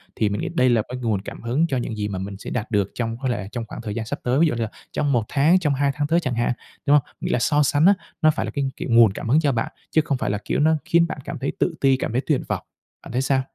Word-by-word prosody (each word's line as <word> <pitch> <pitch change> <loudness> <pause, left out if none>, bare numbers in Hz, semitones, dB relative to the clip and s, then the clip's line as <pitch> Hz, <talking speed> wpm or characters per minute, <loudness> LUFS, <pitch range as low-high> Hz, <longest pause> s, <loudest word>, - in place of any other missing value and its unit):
Thì 110 - +1
mình 100 - -2
nghĩ - - -2
đây 130 -3 +4
là 120 -2 +3
cái 125 - -4
nguồn 110 -5 0
cảm - - -9
hứng 130 +8 +1
cho 135 - -1
những 120 -2 -3
gì 105 -1 -2
mà 100 -3 -4
mình 95 +1 -6
sẽ - - -8
đạt 120 0 -3
được 100 -3 +1
trong 115 -1 -2
có 130 - 0
lẽ 115 -5 -2
trong 120 -1 -4
khoảng - - -8
thời 105 -2 -5
gian 115 -1 -3
sắp - - -4
tới, 125 +3 +1
ví 165 - +5
dụ 135 - -1
như 115 - -3
là 110 - -3 0.2
trong 145 - 0
1 120 -4 +2
tháng, 155 +6 +4
trong 150 -5 +1
2 140 +1 +2
tháng 145 -1 -1
tới 165 +3 +3
chẳng 130 -8 -2
hạn, 120 +1 +1 0.3
đúng 145 - +4
hông? 140 - 0 0.2
Nghĩa - - -2
là - - +2
so 145 +6 +3
sánh 145 +2 +3
á, 200 - +8 0.3
nó 155 -1 +6
phải - - -2
là - - -5
cái, 140 -1 -1
kiểu, - - -5
nguồn 115 -3 +7
cảm 115 - -5
hứng 145 +6 +5
cho 150 -3 +2
bạn, 115 -3 -2 0.2
chứ 160 - +4
không 140 -5 0
phải - - -2
là, 105 - 0
kiểu, - - 0
nó 160 +2 +4
khiến 170 0 +3
bạn - - -5
cảm - - -5
thấy 140 - -1
tự 170 - +1
ti, 135 -1 +5
cảm 130 - -3
thấy 125 +3 0
tuyệt 150 -4 +1
vọng. - - -2 0.4
Bạn - - -10
thấy 125 +2 0
sao? 135 0 +2
130 Hz, 330 wpm, -23 LUFS, 115-150 Hz, 0.4 s, á